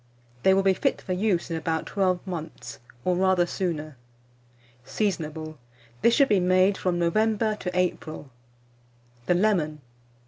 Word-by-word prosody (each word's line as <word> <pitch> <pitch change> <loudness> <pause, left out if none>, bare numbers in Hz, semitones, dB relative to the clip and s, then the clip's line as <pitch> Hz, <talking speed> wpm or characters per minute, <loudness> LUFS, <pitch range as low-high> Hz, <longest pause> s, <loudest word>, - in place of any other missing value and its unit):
They 190 +6 +5
will 195 - +2
be 195 0 +4
fit - - 0
for 185 - -4
use 180 -3 0
in 165 - -1
about 160 0 -2
12 185 -2 0
months, 160 - -7 0.3
or 180 - +2
rather 185 -1 +3
sooner. 155 -6 -3 0.9
Seasonable. 155 - -3 0.4
This 235 - +4
should 275 - +5
be 205 - +4
made 185 +2 +3
from 180 -2 -1
November 215 +5 +1
to 180 -3 -4
April. 160 -5 -2 1.0
THE 180 - +3
LEMON. 175 -7 +1
180 Hz, 140 wpm, -26 LUFS, 160-195 Hz, 1.0 s, They